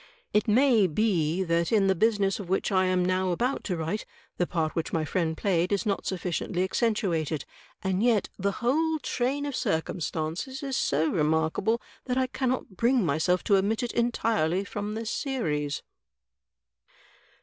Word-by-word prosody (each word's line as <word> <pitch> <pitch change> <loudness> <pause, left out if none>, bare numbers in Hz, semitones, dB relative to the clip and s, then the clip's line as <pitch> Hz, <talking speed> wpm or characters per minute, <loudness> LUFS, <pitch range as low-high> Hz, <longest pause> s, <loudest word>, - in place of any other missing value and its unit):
It 210 - +2
may 230 -2 +5
be 175 -2 +1
that 170 -1 0
in 210 -3 +4
the 190 - +4
business 200 0 +1
of 190 -4 -7
which 190 +2 0
I 185 -1 +3
am 185 -1 +2
now 185 0 +1
about 245 +10 0
to 180 -4 -1
write 165 +7 -2 0.3
the 175 - +1
part 160 -3 -1
which 165 - -2
my 160 -1 0
friend 160 0 -1
played 180 -2 +1
is 200 -3 0
not 200 -2 -1
sufficiently 180 0 -1
accentuated; 185 - 0 0.4
and 190 0 0
yet 230 -3 +3
the 200 +1 0
whole 315 +6 +2
train 270 +4 -1
of 285 - -3
drctunstances 165 - -2
is 270 -2 -2
so 155 -3 +1
remarkable 160 +8 +1 0.3
that 250 -1 -1
I 260 - +3
cannot 255 -5 -2
bring 240 -2 +3
myself 165 +4 +1
to 200 -3 +4
omit 215 +5 0
it 240 - -2
entirely 225 -7 +1
from 205 +1 -4
this 225 0 -3
series." 150 - -2
195 Hz, 160 wpm, -27 LUFS, 170-230 Hz, 0.4 s, may